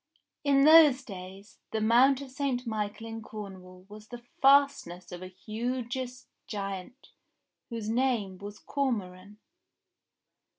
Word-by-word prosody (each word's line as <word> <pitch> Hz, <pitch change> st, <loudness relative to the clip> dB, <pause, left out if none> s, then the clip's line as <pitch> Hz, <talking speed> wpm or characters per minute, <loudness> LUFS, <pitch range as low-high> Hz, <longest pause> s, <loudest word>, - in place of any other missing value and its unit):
In 275 Hz, -1 st, +4 dB
those 300 Hz, -4 st, +7 dB
days, 195 Hz, -2 st, -11 dB
the 220 Hz, -, -2 dB
Mount 250 Hz, +5 st, +4 dB
of 275 Hz, -2 st, -9 dB
St. 260 Hz, -2 st, -2 dB
Michael 215 Hz, -1 st, -3 dB
in 225 Hz, 0 st, -6 dB
Cornwall 185 Hz, -4 st, -10 dB
was 210 Hz, +1 st, -12 dB
the 240 Hz, 0 st, -10 dB, 0.2 s
fastness 275 Hz, -11 st, +3 dB
of 175 Hz, 0 st, -8 dB
a 185 Hz, -, -7 dB
hugeous 245 Hz, +5 st, -5 dB, 0.2 s
giant 200 Hz, +4 st, -6 dB, 0.6 s
whose 230 Hz, -3 st, -5 dB
name 225 Hz, -6 st, 0 dB
was 205 Hz, +1 st, -8 dB
Cormoran. 205 Hz, -8 st, -3 dB
225 Hz, 120 wpm, -29 LUFS, 195-260 Hz, 0.6 s, those